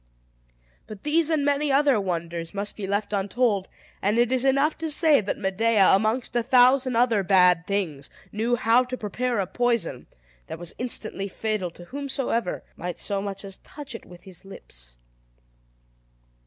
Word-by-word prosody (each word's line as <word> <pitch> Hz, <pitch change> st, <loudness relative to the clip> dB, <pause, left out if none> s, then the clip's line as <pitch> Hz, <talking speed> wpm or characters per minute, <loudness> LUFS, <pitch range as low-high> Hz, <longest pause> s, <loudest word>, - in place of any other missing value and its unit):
But 210 Hz, -2 st, -10 dB
these 315 Hz, +1 st, +2 dB
and 305 Hz, -3 st, +1 dB
many 285 Hz, 0 st, +1 dB
other 275 Hz, -5 st, +3 dB
wonders 170 Hz, -1 st, -4 dB
must 205 Hz, +1 st, -3 dB
be 200 Hz, -3 st, -5 dB
left 205 Hz, +1 st, -2 dB
untold; 200 Hz, 0 st, 0 dB, 0.3 s
and 205 Hz, +3 st, +1 dB
it 240 Hz, 0 st, +3 dB
is 260 Hz, -1 st, +1 dB
enough 275 Hz, +3 st, +2 dB
to 325 Hz, -1 st, -2 dB
say, 300 Hz, -3 st, +4 dB
that 200 Hz, -, -3 dB
Medea, 200 Hz, +1 st, +3 dB
amongst 220 Hz, +6 st, +1 dB
a 240 Hz, -, +3 dB
thousand 255 Hz, +1 st, +4 dB
other 230 Hz, -3 st, +3 dB
bad 180 Hz, -3 st, +4 dB
things, 180 Hz, -9 st, -2 dB, 0.2 s
knew 230 Hz, +3 st, 0 dB
how 235 Hz, +1 st, +3 dB
to 255 Hz, 0 st, -6 dB
prepare 240 Hz, +3 st, -2 dB
a 195 Hz, -, +1 dB
poison, 230 Hz, -, -1 dB, 0.4 s
that -, -, -6 dB
was 175 Hz, 0 st, -4 dB
instantly 215 Hz, -5 st, -2 dB
fatal 210 Hz, -2 st, -2 dB
to 175 Hz, +1 st, -13 dB
whomsoever 260 Hz, -4 st, -2 dB
might 175 Hz, 0 st, -5 dB
so 200 Hz, -1 st, -2 dB
much 200 Hz, 0 st, -5 dB
as 195 Hz, -1 st, -6 dB
touch 290 Hz, -3 st, -10 dB
it 230 Hz, -, -9 dB
with 175 Hz, -1 st, -14 dB
his 185 Hz, -2 st, -10 dB
lips. -, -, -10 dB
215 Hz, 165 wpm, -25 LUFS, 190-255 Hz, 0.4 s, say